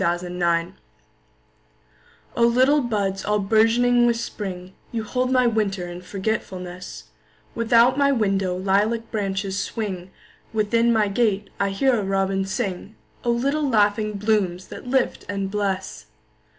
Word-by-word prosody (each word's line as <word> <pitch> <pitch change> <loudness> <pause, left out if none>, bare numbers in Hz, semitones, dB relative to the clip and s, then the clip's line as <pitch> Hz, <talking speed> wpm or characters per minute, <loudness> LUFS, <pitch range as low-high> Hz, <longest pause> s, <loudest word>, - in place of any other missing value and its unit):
A 175 -1 +2
Song 180 - -8
in 180 0 -6
Spring 170 +1 +1 1.6
O - - -1
LITTLE 260 +5 +4
buds 200 -5 -1
all 210 0 +1
bourgeoning 230 +4 +3
with 235 -1 +2
Spring, 190 -5 -6 0.2
You 230 -2 -2
hold 250 +3 -1
my 255 -1 +4
winter 205 -6 0
in 175 0 -8
forgetfulness; 185 -2 -5 0.5
Without 235 +3 +4
my 280 0 +4
window 195 -6 +1
lilac 210 +5 0
branches 195 -2 -2
swing, 195 -4 -4 0.4
Within 230 +2 +2
my 220 -2 +3
gate 205 -1 0
I 200 0 +1
hear 240 +5 +2
a - - -2
robin 195 0 0
sing—O 200 +3 -5
little 275 +5 +1
laughing 215 -1 +2
blooms 200 -3 0
that - - -9
lift 260 0 0
and 195 -1 -3
bless! 195 -2 -3
210 Hz, 135 wpm, -23 LUFS, 190-235 Hz, 1.6 s, LITTLE